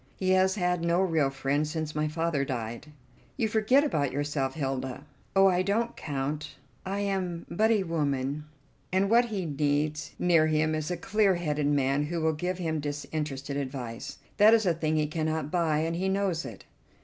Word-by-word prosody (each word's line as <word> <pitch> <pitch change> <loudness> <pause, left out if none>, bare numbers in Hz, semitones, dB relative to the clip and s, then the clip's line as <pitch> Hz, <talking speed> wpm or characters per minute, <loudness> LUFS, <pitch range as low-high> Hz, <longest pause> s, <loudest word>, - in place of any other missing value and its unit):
He 185 -1 0
has 190 +1 +4
had 180 -3 0
no 170 +1 +2
real 165 -7 +2
friend 135 +2 -1
since 155 0 -3
my 150 0 0
father 160 -2 0
died." 120 -1 -4 0.5
"You 230 -4 +1
forget 220 +6 +3
about 145 - 0
yourself, 145 -1 -2
Hilda." 135 -2 -3 0.3
"Oh, 195 0 +6
I 185 -1 +4
don't 220 +5 0
count; 145 +1 -4 0.3
I 200 +1 -2
am 185 -4 -2
but 220 +5 +2
a 215 -4 +3
woman, 145 -3 -1 0.5
and 195 +2 +2
what 240 +1 +6
he 205 -6 -3
needs 150 +1 -1
near 165 -3 +4
him 155 0 +1
is 155 0 -2
a 180 - -2
clear 195 +2 +2
headed 150 -4 -1
man 140 0 +2
who 170 +2 -2
will 160 0 +1
give 180 +4 -2
him 160 -3 -2
disinterested 145 -1 -4
advice. 130 -4 -5 0.2
That 215 +2 +7
is 220 -2 +1
a 175 - +3
thing 155 -1 -1
he 155 -1 +2
cannot 155 -1 -2
buy, 160 -4 +1
and 165 +1 -1
he 190 +3 0
knows 190 -4 0
it." - - -9
160 Hz, 185 wpm, -28 LUFS, 145-185 Hz, 0.5 s, That